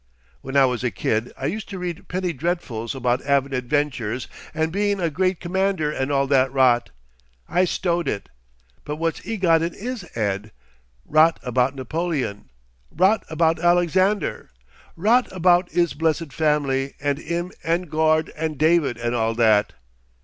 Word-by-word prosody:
When 135 +1 -3
I 135 - +7
was 125 -1 -1
a 125 - +1
kid, 115 +1 -1
I 135 - -5
used 210 +9 -3
to 195 - -6
read 175 -2 -5
penny 180 -1 -2
dreadfuls 140 -7 -3
about 125 -1 0
'avin 140 -1 +1
adventures 125 -3 -1 0.2
and 160 +1 -1
bein' 205 +1 0
a 170 -3 0
great 185 +3 0
c'mander 185 -3 0
and 135 -1 -2
all 140 -1 +2
that 135 -1 +3
rot. 125 -3 +3 0.6
I 180 +1 +2
stowed 175 -2 -1
it. 100 -6 -3 0.6
But 150 - -4
what's 165 +1 -2
'e 225 - -2
got 165 -4 +3
in 165 +1 -2
'is 245 +2 -5
head? 105 -1 -2 0.5
Rot 155 +2 +4
about 125 +2 +1
Napoleon, 140 - -3 0.4
rot 190 +6 +2
about 160 +1 +1
Alexander, 175 +4 +1 0.5
rot 225 +8 +2
about 180 0 +3
'is 170 -2 +1
blessed 160 -2 -1
family 140 -3 0
and 145 0 -1
'im 170 +3 -3
and 170 +2 0
Gord 155 0 +1
and 155 -1 -3
David 155 -5 +2
and 120 0 -2
all 115 -1 0
that. 110 -3 +3
155 Hz, 155 wpm, -23 LUFS, 130-175 Hz, 0.6 s, I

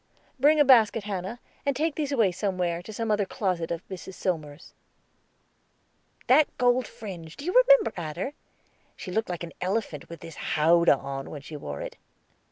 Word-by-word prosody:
"Bring 300 +3 +5
a 295 - +6
basket, 225 -4 +5
Hannah, 200 +3 -4 0.2
and 280 -1 0
take 315 +3 0
these 290 -2 -2
away 225 -9 +3
somewhere, 180 -3 -1
to 200 - -10
some 225 +1 -2
other 210 -1 +2
closet 185 -4 -2
of 170 0 -4
Mrs. 190 0 -8
Somers's." 155 -4 -4 1.5
"That 290 +4 +6
gold 245 0 +3
fringe, 170 -7 -9
do 285 - -8
you 360 - -1
remember, - - +6
Adder? 170 - -4 0.6
She 185 - -8
looked 220 +2 -1
like 175 -1 -4
an 165 - -7
elephant 185 -6 -2
with 170 0 -10
his 165 -1 -10 0.2
howdah 170 0 +5
on 135 0 -6
when 145 -2 -8
she 155 - -9
wore 70 - -6
it." - - -7
190 Hz, 175 wpm, -27 LUFS, 170-245 Hz, 1.5 s, a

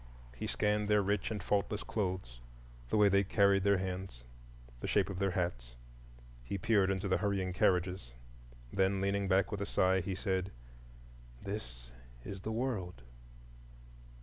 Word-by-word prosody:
He - - -4
scanned 105 0 +1
their 105 -1 +4
rich 100 -1 0
and 105 -4 -4
faultless 105 +1 0
clothes, 90 - -3 0.5
the - - +1
way 105 -1 +6
they 100 0 +4
carried 100 -1 +3
their 100 0 +4
hands, 90 -8 -5 0.6
the - - -4
shape 100 -1 +2
of 95 - -5
their 100 -1 +2
hats; 75 -11 -3 0.7
he 80 +11 -3
peered 100 -2 +3
into 95 +1 -1
the 95 - +2
hurrying 100 -3 -1
carriages. 90 -6 +1 0.6
Then, 95 0 +2
leaning 100 0 0
back 95 -1 +2
with 100 - -3
a 100 - -2
sigh, 95 -1 +3
he 95 +1 -3
said, 95 0 -1 0.9
"This - - -7 0.3
is 95 -1 -6
the 110 - -4
World." 110 - -3
95 Hz, 150 wpm, -33 LUFS, 90-100 Hz, 0.9 s, way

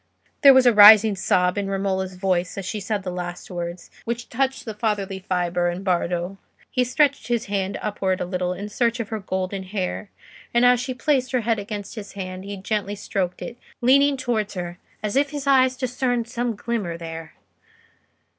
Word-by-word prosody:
There 275 -2 +9
was 260 -1 +6
a 245 - +6
rising 210 0 +9
sob 180 0 +1
in 195 -1 -3
Romola's 190 -1 -2
voice 180 -1 -1
as 195 - -4
she 210 +3 -3
said 205 0 -3
the 185 - -4
last 180 0 -6
words, 175 0 -6
which 235 +1 -4
touched 270 0 -1
the 220 - -5
fatherly 205 -3 -2
fibre 175 -1 0
in 175 +2 -5
Bardo. 180 0 -1 0.3
He 250 - +2
stretched 280 +3 +1
his 240 -1 0
hand 200 -1 -2
upward 195 -3 -1
a - - -2
little 180 0 -2
in 195 +3 -5
search 235 +3 0
of 230 - -4
her 220 -1 -3
golden 190 0 -3
hair, 190 +1 -4 0.5
and 240 +1 +5
as 245 -1 +5
she 255 +1 -4
placed 260 0 0
her 255 - +2
head 225 -1 0
under 205 0 -5
his 210 -3 -8
hand, 185 -1 -6
he 200 0 -6
gently 205 +1 -2
stroked 185 -3 -3
it, 240 - -8 0.2
leaning 275 +3 +4
towards 220 -5 -2
her 175 -1 -5 0.2
as 210 -1 -2
if 280 +1 +3
his 290 -1 -5
eyes 260 -2 +4
discerned 250 -2 -1
some 235 0 -2
glimmer 205 -6 -3
there. 165 -1 -8
205 Hz, 190 wpm, -23 LUFS, 185-240 Hz, 0.5 s, There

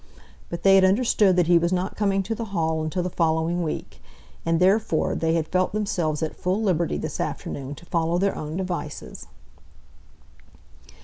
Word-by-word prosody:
But 170 0 -6
they 195 - +6
had 195 -1 +6
understood 200 -1 +3
that 180 -1 +3
he 170 0 +5
was 170 +1 0
not 185 +1 -1
coming 195 -2 +1
to 215 +4 -3
the 230 +1 -4
Hall 160 -1 0
until 165 +3 -2
the 180 - -2
following 165 +1 +1
week, 160 -3 -5 0.5
and 165 0 +2
therefore 190 -2 +2
they 165 0 0
had 160 -2 0
felt 185 +1 0
themselves 175 -8 -1
at 155 - -3
full 185 +3 -1
liberty 170 - +1
this - - -5
afternoon 140 +1 -4
to 170 - -14
follow 170 0 0
their 195 +2 +1
own 155 +2 -5
devices. 180 -5 -5
175 Hz, 175 wpm, -24 LUFS, 160-190 Hz, 0.5 s, they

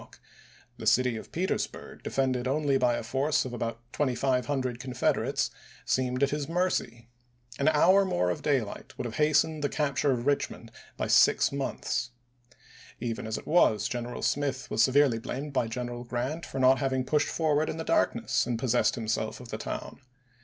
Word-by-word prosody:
o'clock; - - -17 0.6
the 110 - -5
city 125 +1 +3
of 110 - -8
Petersburg, 185 +3 -3
defended 130 -2 -1
only 140 0 +1
by 125 -2 +3
a 120 - -4
force 135 +6 0
of 125 - -6
about 115 -1 -4
2500 130 -2 0
Confederates, 125 -1 0 0.3
seemed 130 +1 0
at 140 - +2
his 145 0 -3
mercy. 165 -10 -1 0.5
An 140 - +1
hour 180 +6 +5
more 90 - +1
of 90 - -4
daylight 135 -8 -2
might - - -4
have 120 0 -5
hastened 155 0 +2
the 145 - +1
capture 145 -1 0
of 120 -2 -1
Eichmond 140 -4 -1 0.3
by - - -1
six - - +4
months. 135 -3 -2 0.9
Even 115 0 -3
as 110 - -2
it - - -9
was, 155 -10 +3
General 120 0 -5
Smith 135 -2 -1
was 110 - +2
severely 135 -3 +4
blamed 140 +5 -5
by 120 -3 +1
General 120 +1 -5
Grant 130 +6 -3
for - - -7
not 130 0 +5
having 130 -2 0
pushed 150 0 +1
forward 155 -1 +1
in - - -4
the 160 - -3
dark - - +2
ness - - 0
and 120 -2 -1
possessed 120 0 +2
himself 110 -2 -2
of 125 -2 -11
the - - -5
town. - - -6
130 Hz, 175 wpm, -28 LUFS, 120-145 Hz, 0.9 s, hour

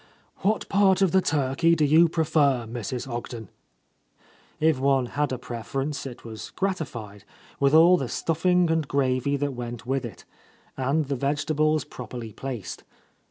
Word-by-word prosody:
"What 210 +3 0
part 195 -1 +3
of 185 - +3
the 190 - +4
turkey 155 +2 +2
do 155 -2 +2
you 160 +3 +5
prefer, 150 -6 +2
Mrs. 120 +2 -5
Ogden?" 120 -3 -6 1.1
If 155 -3 +2
one 135 -1 +2
had 145 +4 -2
a 130 - -2
preference, 135 +5 -4
it 125 -2 -10
was 110 -1 -8
gratified, 125 - -4 0.4
with 140 +2 +3
all 170 +3 +7
the 135 -6 -3
stuffing 175 +1 +1
and 160 -3 0
gravy 135 0 +1
that 140 0 -2
went 120 -1 -6
with 135 +1 -1
it, 120 - -9 0.5
and 140 +4 0
the 140 0 -2
vegetables 150 +2 0
properly 120 -2 -8
placed. 125 -6 -6
140 Hz, 150 wpm, -25 LUFS, 125-160 Hz, 1.1 s, all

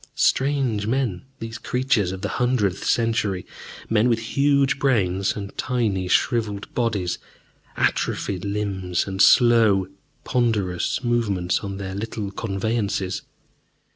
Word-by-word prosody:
Strange 130 -7 +1
men, 115 -7 0 0.2
these 115 -1 -7
creatures 120 -6 0
of 95 +1 -7
the - - 0
hundredth 110 -7 +1
century, 110 -5 0 0.4
men 115 +2 +3
with 115 - +3 0.2
huge 140 -1 +3
brains 100 -9 +1
and 100 -1 -7
tiny 110 -7 0
shriveled 105 -1 0
bodies, 105 -7 -1 0.6
atrophied 95 -3 0
limbs, 100 -3 -1
and 95 -1 -2
slow, 115 -6 +5 0.4
ponderous 110 -4 0
movements 105 -7 +1
on 100 -1 -5
their 95 -1 -5
little 105 0 -4
conveyances. 100 -2 -2
105 Hz, 110 wpm, -23 LUFS, 95-120 Hz, 0.6 s, slow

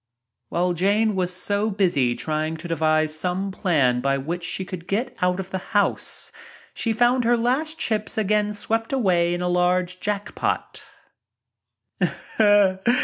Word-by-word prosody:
While 175 +1 0
Jane 205 +5 +2
was 180 -1 0
so 205 +3 0
busy 170 - +1
trying 155 +1 -2
to 165 +2 -8
devise 155 -1 +1
some 185 +4 -1
plan 140 -10 +1
by 135 +1 +1
which 170 +6 -4
she 185 +2 -2
could 180 -2 -8
get 220 +6 -2
out 180 +1 +1
of 190 0 -6
the 190 - -2
house, 205 +1 -1 0.4
she 230 - -1
found 245 +3 +3
her 240 +1 +3
last 270 +7 0
chips 215 -8 -1
again 210 0 +1
swept 225 +2 -2
away 180 -10 +2
in 175 - -3
a - - 0
large 180 0 +1
jack 205 0 -3
pot. - - -2
185 Hz, 145 wpm, -23 LUFS, 170-210 Hz, 0.4 s, found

